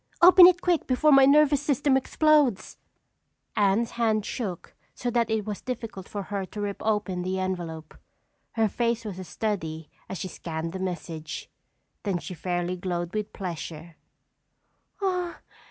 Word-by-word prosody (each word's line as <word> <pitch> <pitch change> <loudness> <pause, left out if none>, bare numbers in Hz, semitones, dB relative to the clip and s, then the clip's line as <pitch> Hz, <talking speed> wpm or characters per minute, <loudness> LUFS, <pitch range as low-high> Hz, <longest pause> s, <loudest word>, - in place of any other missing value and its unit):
Open 360 +1 +10
it 355 -1 +3
quick 350 -3 +1
before 285 +4 +3
my 270 -1 +7
nervous 290 0 +5
system 285 -1 +2
explodes!" 285 -4 +2 0.8
Anne's 210 +3 +2
hand 220 -3 +1
shook 195 -9 -5 0.2
so 245 - -2
that 235 -1 +1
it 220 -2 0
was 210 -2 -5
difficult 230 -6 -6
for 205 -1 -4
her 200 0 -3
to 200 +3 -8
rip 205 -1 -3
open 210 -4 0
the 185 +1 -2
envelope. 175 -4 -4 0.6
Her 225 -1 +2
face 230 +1 -1
was 195 -3 -6
a - - -5
study 165 -6 -4 0.2
as 190 - -4
she 190 - -4
scanned 165 -1 -5
the 190 - -4
message. 165 -4 -5 0.5
Then 195 -4 -1
she 180 - -7
fairly 175 +1 -2
glowed 175 -1 -3
with 215 -1 -3
pleasure. 170 -3 -6
205 Hz, 150 wpm, -26 LUFS, 180-240 Hz, 0.8 s, Open